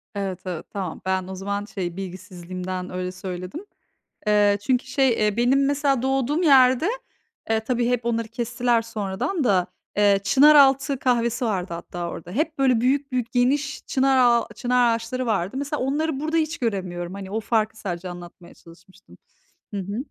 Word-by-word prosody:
Evet, 190 -2 -3
evet, 180 -3 -5
tamam. 190 -5 -5
Ben 190 -1 -1
o 190 - -6
zaman, 200 +2 -3
şey, 180 -4 -5
bilgisizliğimden 185 -1 -6
öyle 180 0 -4
söyledim. 185 - -7 0.6
Eee, 205 -1 +4
çünkü 250 +2 +1
şey, 265 0 +2
eee, 210 0 0
benim 265 +3 +3
mesela 280 -2 +1
doğduğum 270 +5 0
yerde, 260 +1 +5 0.6
eee, 220 0 +2
tabii 240 +1 -1
hep 245 -1 -1
onları 230 -1 -1
kestiler 235 +1 0
sonradan 225 - -3
da, 185 -6 +2 0.3
eee, 200 -1 +4
çınaraltı 275 0 +5
kahvesi 240 -1 +1
vardı 185 -5 -2
hatta 170 0 -5
orada. 170 +1 -8
Hep, 310 - -1
böyle, 255 -4 +3
büyük 275 +2 +1
büyük 245 -2 -2
geniş 270 +4 +1
çınar 270 -2 +2
ağa 240 -2 +4
çınar 245 -2 +2
ağaçları 245 +3 -4
vardı. 205 +1 -1
Mesela 285 +1 -3
onları 285 +2 -1
burada 315 +2 -1
hiç 315 +1 0
göremiyorum. 185 -6 -3
Hani, 195 -1 -8
o 220 - -1
farkı 220 -1 0
sadece 180 -2 -5
anlatmaya 175 0 -11
çalışmıştım. 180 +3 -19 0.6
Hı - - -2
hı. 200 +3 -5
230 Hz, 160 wpm, -23 LUFS, 190-265 Hz, 0.6 s, yerde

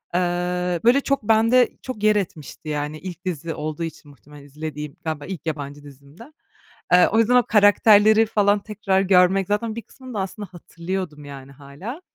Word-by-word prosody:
Iıı, 180 0 -1
böyle, 250 +4 +4
çok 275 -4 -1
bende 225 +3 +4
çok 255 -5 -7
yer 215 0 +4
etmişti, 160 -6 -5
yani. 150 +1 -3
İlk 180 0 -9
dizi 165 -2 -4
olduğu 155 +2 -5
için 160 -2 -8
muhtemelen 145 +1 -16
izlediğim. 150 +1 -7
Galiba 155 -3 -4
ilk 185 -3 -7
yabancı 145 -2 -5
dizimdi. 140 - -15 0.7
Iıı, 180 0 +7
o 225 - +2
yüzden 230 +2 +3
o 245 - +4
karakterleri 215 +1 +5
falan 205 -1 +2
tekrar 200 -2 -1
görmek, 190 0 +3
zaten 215 +2 -1
bir 230 - -5
kısmını 260 +3 -13
da 205 - -2
aslında 195 +1 -6
hatırlıyordum, 170 -3 -6
yani, 140 -1 -11
hâlâ. 145 - -9
180 Hz, 170 wpm, -22 LUFS, 150-210 Hz, 0.7 s, Iıı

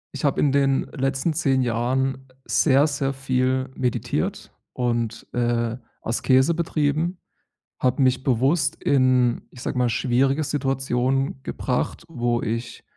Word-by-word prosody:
ich - - -6
habe 140 - +1
in 145 - +3
den 135 -1 +2
letzten 135 +4 0
10 135 -5 +1
Jahren 130 +3 -1 0.2
sehr, 140 0 +4
sehr 140 -2 -1
viel 130 -1 0
meditiert 125 -2 -2 0.2
und, 120 -2 -2
äh, 120 -1 0 0.3
Askese 130 +6 +3
betrieben. 160 +1 0 0.6
Habe 130 +2 +1
mich 130 0 +2
bewusst 135 +5 +2
in, 130 -3 +3
ich 125 - -12
sage 125 - -3
mal, 125 -1 +3
schwierige 135 +5 +1
Situationen 135 -1 -1
gebracht, 125 +5 -2
wo 120 -5 -1
ich 115 +1 -4
130 Hz, 125 wpm, -23 LUFS, 125-140 Hz, 0.6 s, sehr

